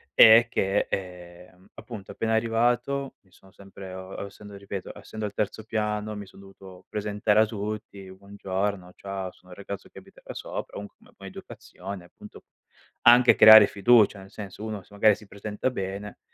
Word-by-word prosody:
è 110 +2 +9
che, 100 -3 0
ehm, 90 0 -8
appunto, 105 -6 -10
appena 110 0 -2
arrivato, 120 +4 0
mi 95 - -31
sono 95 +2 -21
sempre 95 -1 -12
uhm, 95 - -7
o - - -8
ossendo 100 0 -12
ripeto, 100 -1 -7
essendo 110 -1 -7
al 105 - -5
terzo 105 +1 -3
piano, 105 -1 -3
mi 100 -1 -8
son 95 - -17
dovuto 95 -1 -15
presentare 105 0 0
a 110 - +6
tutti, 105 -2 -6
"Buongiorno, 100 -1 -4
ciao, 95 -2 -6
sono 90 0 -21
il 90 - -12
ragazzo 100 0 -8
che - - -18
abita - - -15
da - - -9
sopra", - - -7
comunque 100 0 -10
come - - -22
poi - - -10
è - - -7
educazione, 95 0 -10
appunto, - - -15 0.6
anche 120 +1 +7
creare 110 -1 +10
fiducia, 105 0 +4
nel 95 0 -13
senso 105 -1 -9
uno 105 -3 -5
se 100 - -22
magari 105 0 +4
si 105 - -15
presenta 105 +5 -4
bene, 100 -2 -6
100 Hz, 180 wpm, -26 LUFS, 95-110 Hz, 0.6 s, creare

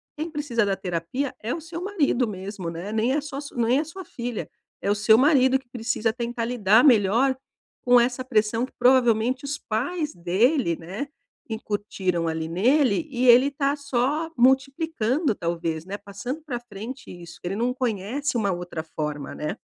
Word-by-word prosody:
quem 315 +2 -4
precisa 290 -7 0
da 200 -1 +1
terapia 190 +9 -3
é 225 - -3
o 335 - -5
seu 335 +2 -7
marido 295 - +1
mesmo, 190 -3 -5
né? 170 +5 -6
Nem 225 +4 +1
é 295 - +1
só 285 -2 -7
s 285 0 -9
nem 240 +2 +2
é 305 - 0
sua 370 +4 -9
filha, 240 -5 -5 0.4
é 200 - +2
o 205 - +2
seu 215 +2 +5
marido 265 -1 +5
que 265 - -18
precisa 230 -2 -1
tentar 235 -1 -3
lidar 225 -1 +4
melhor 240 +1 +4 0.5
com 245 0 +7
essa 245 +2 0
pressão 225 -1 +1
que - - -17
provavelmente 250 0 +3
os 285 +1 -3
pais 295 +9 -2
dele, 185 - +2
né, 190 - -5 0.4
incutiram 200 -6 -2
ali 160 0 -3
nele, 250 - +2
e 255 0 +1
ele 250 +4 +7
tá 280 0 0
só 285 +3 -1
multiplicando 270 - +2
talvez, 165 -2 -2
né? 200 +2 -5
Passando 205 +9 -6
pra 245 -5 -3
frente 240 +4 -8
isso, 170 -2 -11
que 175 - -5
ele 195 - -3
não 245 +2 0
conhece 245 +2 -2
uma 200 -4 +1
outra 175 -2 -5
forma, 150 -3 -5
né? 150 - -4
240 Hz, 175 wpm, -25 LUFS, 200-270 Hz, 0.5 s, com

